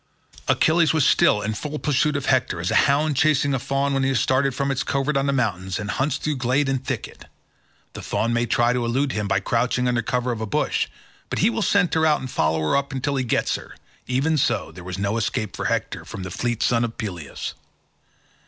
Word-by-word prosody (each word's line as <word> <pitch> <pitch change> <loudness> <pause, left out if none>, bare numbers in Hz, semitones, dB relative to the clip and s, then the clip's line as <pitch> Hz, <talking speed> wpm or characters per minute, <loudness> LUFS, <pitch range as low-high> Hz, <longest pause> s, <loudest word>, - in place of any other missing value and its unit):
Achilles 165 0 +3
was 155 -4 +3
still 105 -6 +4
in 110 +1 -1
full 150 +7 -5
pursuit 150 0 +1
of 140 -1 -2
Hector, 130 -9 +1
as 85 +2 -2
a - - +4
hound 145 +1 +2
chasing 140 0 +3
a 135 - 0
fawn 140 +2 -1
which 135 - +1
he 135 - +1
has 130 -3 +1
started 130 +2 +1
from 140 0 0
its 135 - -1
covert 140 +2 -1
on 135 0 +1
the - - +2
mountains, 95 -8 -1
and 105 0 -3
hunts 140 +1 0
through 150 0 -2
glade 130 +3 +1
and 135 -1 -1
thicket. - - -5 0.7
The - - -7
fawn 115 +1 -1
may 120 0 +1
try 120 +1 +2
to 125 -1 -1
elude 130 +4 0
him 105 -3 -2
by - - +1
crouching 125 +1 0
under 120 -1 +1
cover 125 +2 -1
of 115 -2 -4
a 110 - -3
bush, 100 - 0 0.4
but - - -3
he 210 +6 +3
will 225 - -2
scent 200 -4 +2
her 160 - +2
out 155 -2 +4
and 130 -1 -7
follow 80 0 +1
her 80 - +1
up 140 0 0
until 135 +1 -2
he 130 - 0
gets 120 - 0
her—even 145 +5 -3
so 105 - 0
there 90 +2 -11
was 90 +1 -5
no 100 +3 -1
escape 110 -2 -2
for - - -4
Hector - - -1
from 95 - -7
the 90 - -6
fleet 120 +3 -1
son 120 -1 +2
of 115 -1 -4
Peleus. 90 -9 -5
130 Hz, 230 wpm, -23 LUFS, 110-140 Hz, 0.7 s, still